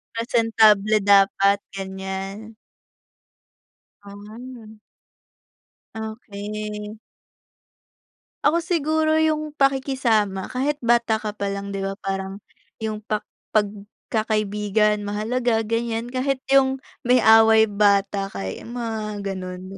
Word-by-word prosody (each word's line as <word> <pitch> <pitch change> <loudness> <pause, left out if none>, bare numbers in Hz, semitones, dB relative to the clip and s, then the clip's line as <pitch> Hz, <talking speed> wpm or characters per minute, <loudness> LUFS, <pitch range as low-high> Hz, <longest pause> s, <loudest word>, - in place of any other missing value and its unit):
Presentable 220 -3 +3
dapat 200 0 +4 0.2
gan'yan. 195 +3 -6 1.5
Hmm. 215 +3 -11 1.2
Okey. 210 -1 -6 1.5
Ako 335 +2 +4
siguro 315 -1 +1
yung 310 -1 0
pakikisama 255 -8 +1
kahit 275 +4 0
bata 235 -1 +3
ka 215 -1 -4
pa 200 -1 -3
lang 200 0 -4
'di 195 - -3
ba 195 0 -3
parang 195 0 -4 0.4
yung 220 -1 -4
pak 215 0 -3 0.3
pagkakaibigan 210 0 0
mahalaga 225 +3 -1
gan'yan 230 +1 -2
kahit 260 +1 -1
yung 265 -1 +4 0.3
may 250 -2 +4
away 220 0 +7
bata 200 -1 +1
kay 95 - -6
mga 220 -3 -5
gano'n. 185 -2 -5
215 Hz, 90 wpm, -23 LUFS, 200-235 Hz, 1.5 s, away